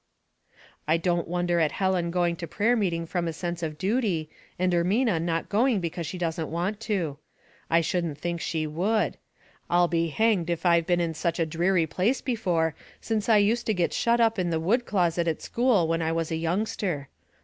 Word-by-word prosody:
" - - -41 0.3
I 160 +2 +3
don't 170 0 0
wonder 175 0 0
at 155 -2 +1
Helen 190 -3 0
going 175 -1 +1
to 170 - -6
prayer 225 +9 +1
meeting 175 -7 0
from 170 0 -2
a - - -1
sense 175 +1 -4
of 155 -2 -4
duty, 190 -7 0 0.3
and 180 0 +1
Ermuia 185 +2 +2
not 165 -1 -1
going 230 +1 +2
because 170 -1 -4
she 180 - -5
doesn't 165 -2 -2
want 180 +6 -2
to. 165 -9 -1 0.5
I 165 +1 +4
shouldn't 165 -3 -1
think 170 +2 -3
she 160 -2 -1
would. 190 +9 0 0.5
I'll 175 0 +4
be 170 -1 0
hanged 190 0 +1
if 170 +1 -2
I've 170 -1 +4
been 175 -1 +2
in 165 -1 -1
Such 165 +2 -1
a 165 - +2
dreary 170 +2 +1
place 195 - 0
before 180 - 0 0.3
since 220 -1 -2
I 220 - +6
used 220 +4 +2
to 220 - +1
get 175 -2 0
shut 235 0 +2
up 225 -3 +3
in 180 -1 0
the 165 -1 0
wood 230 +10 +1
closet 175 -3 +1
at 160 - -2
school 235 -8 +2
when 165 0 0
I 160 0 0
was 165 -1 -2
a - - 0
youngster. 170 -3 -2
175 Hz, 205 wpm, -26 LUFS, 165-200 Hz, 0.5 s, I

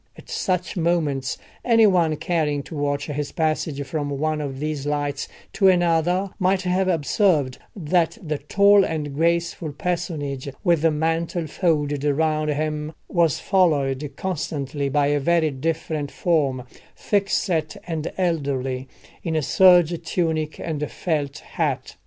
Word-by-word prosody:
At - - -13
such 185 - -1
moments 160 -7 0 0.3
any 230 -2 +5
one 175 -6 +3
caring 150 -3 -1
to 160 - -9
watch 145 0 -1
his 145 -1 -4
passage 155 -3 -1
from 145 +1 -3
one 150 +2 -1
of 135 -2 -5
these 150 -1 -3
lights 145 -1 -2 0.3
to 195 - +3
another 175 +1 +2
might 185 0 +2
have 185 +1 +1
observed 160 - +1 0.2
that 175 +1 +1
the 155 -7 -3
tall 200 +6 +5
and 150 -5 -3
graceful 170 0 0
personage 155 -6 -3
with 170 -4 +3
the 165 - +4
mantle 165 +2 -1
folded 150 -3 0
round 155 +1 +1
him 150 +1 -2
was 170 -5 +2
followed 150 -7 +1
constantly 145 -5 -3
by 145 +1 +2
a 145 0 +2
very 160 +1 +2
different 155 +1 -2
form, 140 -8 0 0.3
thickset 190 -6 0
and 165 -2 -3
elderly, 135 -7 -1 0.4
in 165 -2 -2
a 155 - +1
serge 175 -1 +5
tunic 160 -2 -1
and 150 -3 -3
felt 150 -5 -2
hat. - - -3
155 Hz, 135 wpm, -23 LUFS, 145-175 Hz, 0.4 s, any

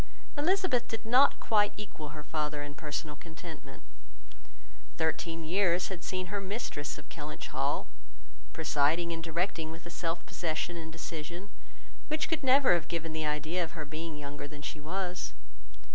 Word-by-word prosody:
Elizabeth 315 -6 +3
did 225 0 -4
not 250 +5 +7
quite 210 -2 +4
equal 175 -7 -6
her 150 0 -7
father 150 -1 -1
in 145 0 -6
personal 150 0 -3
contentment. 160 -2 -9 1.1
Thirteen 165 +1 0
years 180 +1 +3
had 185 -3 -5
seen 185 0 -2
her 200 - +1
mistress 190 -8 -3
of - - -11
Kellynch - - -5
Hall, - - +1 0.7
presiding 160 +2 +3
and 165 -1 -3
directing 165 -1 0
with 165 +1 -8
a 170 - -7
self 165 0 -1
possession 170 +1 -1
and 160 -1 -5
decision 170 +3 -5 0.6
which 310 +1 +1
could 325 -1 +1
never 265 -4 +7
have 170 -2 +2
given 165 -1 -2
the 155 -1 0
idea 155 +4 +1
of 165 - -5
her 160 -3 -4
being 155 +1 -4
younger 145 0 -5
than 145 0 -9
she 155 - -4
was. 180 +3 -2
165 Hz, 160 wpm, -32 LUFS, 155-190 Hz, 1.1 s, not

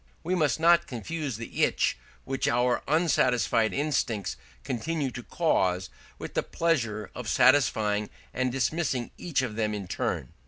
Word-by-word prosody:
We 180 - -1
must 155 -4 +2
not 170 +1 +5
confuse 140 +1 -4
the 115 - -2
itch - - +2 0.3
which 135 0 -2
our 120 +1 +2
unsatisfied 125 - +2
instincts 120 - -1 0.3
continue 140 - -2
to 125 - -6
cause 95 - 0 0.3
with - - -7
the - - +1
pleasure 115 -11 -1
of 125 -3 -5
satisfying 110 -6 +3 0.2
and 130 0 0
dismissing 135 -1 -1
each 160 -7 0
of 115 -4 -3
them 105 -1 0
in 100 -3 -5
turn. 65 -6 -3
125 Hz, 145 wpm, -28 LUFS, 110-155 Hz, 0.3 s, not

